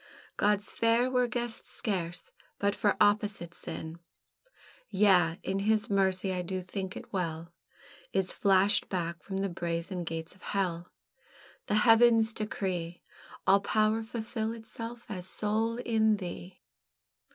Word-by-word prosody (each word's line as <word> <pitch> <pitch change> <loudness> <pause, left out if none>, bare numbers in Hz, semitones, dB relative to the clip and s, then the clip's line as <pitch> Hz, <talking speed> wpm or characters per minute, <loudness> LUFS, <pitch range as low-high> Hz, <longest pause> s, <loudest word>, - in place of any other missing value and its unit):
God's 205 -1 +1
Fair 230 +2 +2
were 250 -1 +3
guessed 240 0 -3
scarce 180 -7 -4 0.3
but 200 0 +1
for 205 - +1
opposite 205 -4 +2
sin; 160 0 -6 0.9
Yea, 185 -5 +4
and 195 +1 -1
His 215 0 +1
Mercy, 190 -1 +1
I 180 - -1
do 185 +1 -3
think 190 +1 -5
it - - -11
well, 170 -2 -3 0.6
Is 190 -1 0
flashed 195 +1 +3
back 170 -3 -3
from 195 +3 -5
the 195 +1 0
brazen 170 +1 -3
gates 165 0 -4
of 190 - -22
Hell. 180 -3 -2 0.8
The 210 - +1
heavens 225 -1 +6
decree 185 -5 -3 0.4
All 195 - +6
power 215 +2 +2
fulfil 225 0 -3
itself 230 +1 -8
as 185 -5 -3
soul 220 +3 0
in 220 -3 +2
thee. 180 -1 -8
200 Hz, 130 wpm, -30 LUFS, 180-220 Hz, 0.9 s, heavens